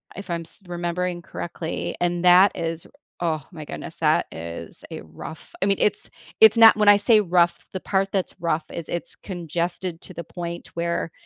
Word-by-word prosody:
if 200 Hz, 0 st, -9 dB
I'm 170 Hz, -1 st, -2 dB
s 165 Hz, +5 st, -11 dB
remembering 175 Hz, 0 st, -2 dB
correctly. 170 Hz, -2 st, -5 dB
And 175 Hz, 0 st, 0 dB
that 180 Hz, +3 st, +7 dB
is- 165 Hz, -1 st, -4 dB, 0.3 s
oh 160 Hz, -4 st, -1 dB
my 155 Hz, -2 st, -8 dB
goodness- 165 Hz, -, -7 dB
that 155 Hz, -1 st, +3 dB
is 85 Hz, 0 st, -8 dB
a -, -, -7 dB
rough, 80 Hz, -, -11 dB
I 195 Hz, -, +3 dB
mean, 195 Hz, -1 st, +2 dB
it's 210 Hz, -, 0 dB, 0.3 s
it's 220 Hz, 0 st, +8 dB
not 225 Hz, -1 st, +9 dB
when 210 Hz, -1 st, +2 dB
I 205 Hz, -, +8 dB
say 215 Hz, +2 st, +5 dB
rough, 175 Hz, -3 st, +3 dB, 0.2 s
the 190 Hz, -, -3 dB
part 195 Hz, 0 st, 0 dB
that's 190 Hz, -2 st, -1 dB
rough 165 Hz, -2 st, 0 dB
is 170 Hz, -, -6 dB
it's 170 Hz, -, -4 dB
congested 175 Hz, -1 st, -4 dB
to 185 Hz, -, -11 dB
the 170 Hz, -, -6 dB
point 170 Hz, +1 st, -7 dB
where 170 Hz, -1 st, -2 dB
175 Hz, 185 wpm, -23 LUFS, 165-185 Hz, 0.3 s, not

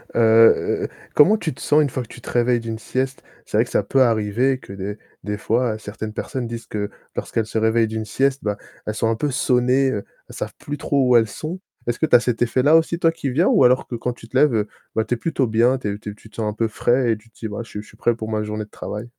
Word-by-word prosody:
Heu, 115 Hz, 0 st, +5 dB, 0.3 s
comment 190 Hz, +9 st, +6 dB
tu 165 Hz, -9 st, -3 dB
te -, -, -14 dB
sens 150 Hz, +1 st, +4 dB
une 140 Hz, -, -2 dB
fois 130 Hz, -, -2 dB
que 120 Hz, -, -8 dB
tu -, -, -12 dB
te -, -, -15 dB
réveilles 120 Hz, 0 st, +2 dB
d'une 115 Hz, -1 st, -5 dB
sieste? 130 Hz, +4 st, -2 dB, 0.2 s
C'est -, -, -2 dB
vrai -, -, +4 dB
que -, -, -13 dB
ça -, -, +1 dB
peut 135 Hz, -, +2 dB
arriver 115 Hz, +2 st, +2 dB
que 100 Hz, -, -11 dB
des 100 Hz, +2 st, -5 dB, 0.3 s
des 105 Hz, 0 st, -3 dB
fois, 115 Hz, +1 st, 0 dB
certaines 110 Hz, 0 st, -6 dB
personnes 120 Hz, +3 st, -4 dB
disent 115 Hz, 0 st, -6 dB
que 105 Hz, -1 st, -3 dB, 0.3 s
lorsqu'elles 115 Hz, -, -2 dB
se 110 Hz, +1 st, -2 dB
réveillent 110 Hz, +1 st, +3 dB
d'une 110 Hz, 0 st, -3 dB
sieste, 135 Hz, +5 st, 0 dB
bah, 105 Hz, -1 st, -1 dB, 0.3 s
elles 105 Hz, -, -2 dB
sont 115 Hz, +1 st, +1 dB
un 115 Hz, -, +1 dB
peu 145 Hz, +6 st, -1 dB
sonnées, 130 Hz, +1 st, +2 dB
heu, 100 Hz, -5 st, -3 dB, 0.2 s
elles -, -, -12 dB
savent -, -, -5 dB
plus 145 Hz, 0 st, -6 dB
trop 140 Hz, -2 st, +1 dB
où 125 Hz, -, +5 dB
elles 115 Hz, -1 st, +5 dB
sont. 160 Hz, -, -6 dB, 0.3 s
Est-ce 120 Hz, 0 st, -2 dB
que 160 Hz, -, +2 dB
tu -, -, +5 dB
as -, -, +9 dB
cet 120 Hz, -1 st, -2 dB
effet-là 130 Hz, +5 st, +4 dB
aussi, 165 Hz, +1 st, +3 dB
toi, 165 Hz, -1 st, +3 dB
qui 165 Hz, -4 st, -4 dB
viens 155 Hz, +9 st, +2 dB
ou 230 Hz, -, +5 dB
alors 125 Hz, +1 st, +4 dB
que 120 Hz, -, -5 dB
quand 120 Hz, +1 st, -2 dB
tu 115 Hz, -, -14 dB
te 125 Hz, -, -13 dB
lèves, 145 Hz, -1 st, +5 dB
heu, 105 Hz, -1 st, +1 dB, 0.3 s
bah, 110 Hz, -, +1 dB
tu 120 Hz, -, -1 dB
es 120 Hz, -, 0 dB
plutôt 140 Hz, -1 st, 0 dB
bien, 120 Hz, +3 st, +3 dB
tu 105 Hz, -5 st, -3 dB
es 105 Hz, -, -7 dB
tu 105 Hz, -, -7 dB
es -, -, -6 dB
tu 110 Hz, -, -17 dB
te -, -, -18 dB
sens 110 Hz, -2 st, -1 dB
un -, -, -4 dB
peu 115 Hz, +1 st, 0 dB
frais 120 Hz, +2 st, +1 dB
et 110 Hz, -, 0 dB
tu 110 Hz, +2 st, -21 dB
te -, -, -44 dB
dis: 110 Hz, -, -5 dB
«Bah, 105 Hz, -, -6 dB
je 115 Hz, -, -15 dB
suis 105 Hz, -, -6 dB
je -, -, -18 dB
suis -, -, -18 dB
prêt 120 Hz, -, +1 dB
pour 110 Hz, -1 st, -6 dB
ma 110 Hz, -, 0 dB
journée 105 Hz, 0 st, -4 dB
de -, -, -26 dB
travail»? 105 Hz, +2 st, -6 dB
115 Hz, 295 wpm, -21 LUFS, 110-130 Hz, 0.3 s, as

